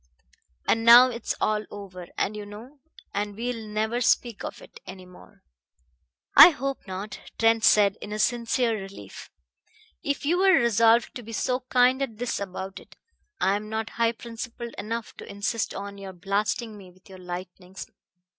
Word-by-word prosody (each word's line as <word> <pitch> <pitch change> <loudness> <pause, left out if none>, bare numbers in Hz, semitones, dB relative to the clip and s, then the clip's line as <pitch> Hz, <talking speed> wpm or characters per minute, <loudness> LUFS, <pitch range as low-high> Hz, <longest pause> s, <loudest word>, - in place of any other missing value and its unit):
"And 225 - +2
now 240 +2 +9
it's 235 -1 -4
all 215 0 0
over, 185 -3 -9
and 210 - -1
you 210 - -6
know 225 +8 -12 0.3
and 205 0 -3
we'll 230 -1 -4
never 220 +3 -1
speak 235 -2 +1
of - - -6
it - - -15
any 185 0 -10
more." 180 0 -18 0.9
"I - - +12
hope 275 - -5
not," 190 +3 -6 0.2
Trent 225 0 +3
said 205 -2 +4
in 210 +1 -5
sincere 235 +1 +1
relief. 195 +1 -11 0.7
"If 285 0 -2
you're 370 +5 +4
resolved 230 0 +3
to 245 - -7
be 225 0 -10
so 250 +3 0
kind 255 +1 +3
as 275 - 0
this 235 +3 -3
about 190 0 -6
it, - - -18 0.4
I 195 +1 +2
am 210 +1 -5
not 220 0 -3
high 230 0 +1
principled 235 0 -8
enough 230 +2 -5
to - - -10
insist 205 +2 -2
on 200 0 -7
your 195 -1 -8
blasting 205 +4 -2
me 190 -2 -13
with 185 +1 -22
your 190 -1 -12
lightnings. 180 +1 -8
220 Hz, 165 wpm, -26 LUFS, 200-235 Hz, 0.9 s, I